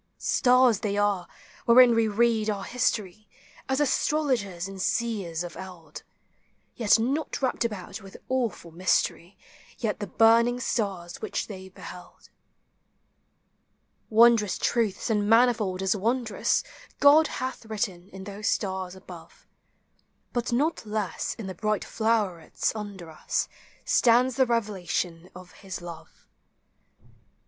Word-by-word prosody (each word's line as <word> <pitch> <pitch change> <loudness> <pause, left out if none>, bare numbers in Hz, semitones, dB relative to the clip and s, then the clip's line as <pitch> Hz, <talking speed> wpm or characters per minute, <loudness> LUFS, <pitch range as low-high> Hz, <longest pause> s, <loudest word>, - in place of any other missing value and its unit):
239 - - -18 0.4
Stars 235 -6 +4
they 205 -1 -2
are, 205 -4 +1 0.4
wherein 240 0 +7
we 230 -1 +2
read 220 0 +2
our 200 -2 -2
history, 215 -4 -2 0.4
As 265 +1 +1
astrologers 255 - 0
and 195 -1 -7
seers 195 -8 -1
of 175 - -8
eld; 175 -5 -10 0.7
Yet 225 -2 +4
not 270 +7 -1
wrapped 255 - 0
about 205 -6 -5
with 195 -1 -12
awful 235 -10 -2
mystery, 175 +1 0 0.5
Like 215 -2 -1
the 205 - -4
burning 230 +4 +4
stars 190 -8 -3
which - - -3
they 190 -2 -9
beheld. 180 -1 -12 1.8
Wondrous 225 -2 +5
truths, 225 -1 0
and 210 -1 +1
manifold 225 -5 +3
as 190 +2 +2
wondrous, 225 +2 0 0.4
God 295 +2 +7
hath 255 -3 -5
written 200 -4 -4
in 190 -1 -10
those 205 +2 -5
stars 190 -2 -2
above; 190 - -13 0.9
But 240 0 -1
not 290 +7 0
less 210 -2 -3
in 225 - -7
the 190 - -5
bright 215 +3 -1
flowerets 210 -7 -1
under 200 -6 -7
us 155 - -2 0.4
Stands 245 +2 +4
the 260 -1 +3
revelation 185 -6 -2
of 180 0 -12
his 190 -3 -8
love. 170 -2 -11
210 Hz, 125 wpm, -26 LUFS, 185-235 Hz, 1.8 s, wherein